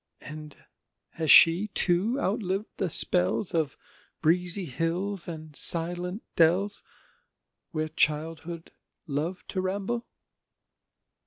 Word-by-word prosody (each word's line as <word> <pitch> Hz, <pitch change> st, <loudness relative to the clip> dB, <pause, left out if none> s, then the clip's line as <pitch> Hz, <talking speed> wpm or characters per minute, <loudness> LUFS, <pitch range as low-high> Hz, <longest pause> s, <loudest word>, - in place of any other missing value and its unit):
And 150 Hz, 0 st, -9 dB, 0.5 s
has 160 Hz, -2 st, -4 dB
she 170 Hz, +8 st, +8 dB
too 190 Hz, +7 st, +1 dB
outliv'd 195 Hz, -2 st, -1 dB
the 190 Hz, -, -1 dB
spells 155 Hz, -, +1 dB
Of 160 Hz, -5 st, -1 dB, 0.4 s
breezy 180 Hz, +3 st, +1 dB
hills 170 Hz, +6 st, -2 dB
and 155 Hz, -3 st, -8 dB
silent 175 Hz, +6 st, +1 dB
dells, 185 Hz, +5 st, +3 dB, 0.9 s
Where 155 Hz, -1 st, -2 dB
childhood 160 Hz, +2 st, -1 dB, 0.3 s
loved 160 Hz, +5 st, -4 dB
to 190 Hz, -, -2 dB
ramble? 200 Hz, +5 st, -3 dB
170 Hz, 95 wpm, -27 LUFS, 160-190 Hz, 0.9 s, she